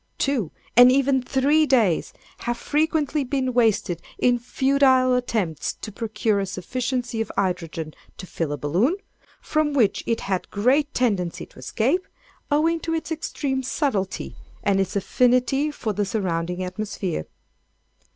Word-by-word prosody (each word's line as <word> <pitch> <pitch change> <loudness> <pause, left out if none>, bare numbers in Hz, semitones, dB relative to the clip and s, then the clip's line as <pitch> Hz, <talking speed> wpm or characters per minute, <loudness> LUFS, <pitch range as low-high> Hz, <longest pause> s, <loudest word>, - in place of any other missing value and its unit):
Two, 260 - 0 0.3
and 245 +1 +9
even 270 0 +3
three 285 +5 +2
days, 225 - +2 0.3
have 240 0 -2
frequently 300 +1 0
been 260 -1 -1
wasted 215 -7 +2 0.2
in 245 -1 +3
futile 260 0 +3
attempts 215 -11 -1
to 215 - -8
procure 220 -1 -1
a 195 - -2
sufficiency 245 +5 -3
of 225 - -3
hydrogen 165 -4 -2 0.2
to 185 - -7
fill 165 -4 -3
a 145 - -2
balloon, 180 - +1 0.5
from 305 -1 0
which 235 -8 +2
it 230 - 0
had 190 -2 -2
great 270 +8 +2
tendency 200 -9 0
to - - -18
escape, 260 - 0 0.4
owing 320 +3 +2
to 325 0 -2
its 325 0 -4
extreme 285 -4 -2
subtlety, 250 - -2 0.3
and 195 -1 +2
its 195 0 -1
affinity 250 +7 +2
for 230 -7 -3
the 205 - 0
surrounding 180 -3 -2
atmosphere. 185 - -4
240 Hz, 140 wpm, -24 LUFS, 195-275 Hz, 0.5 s, and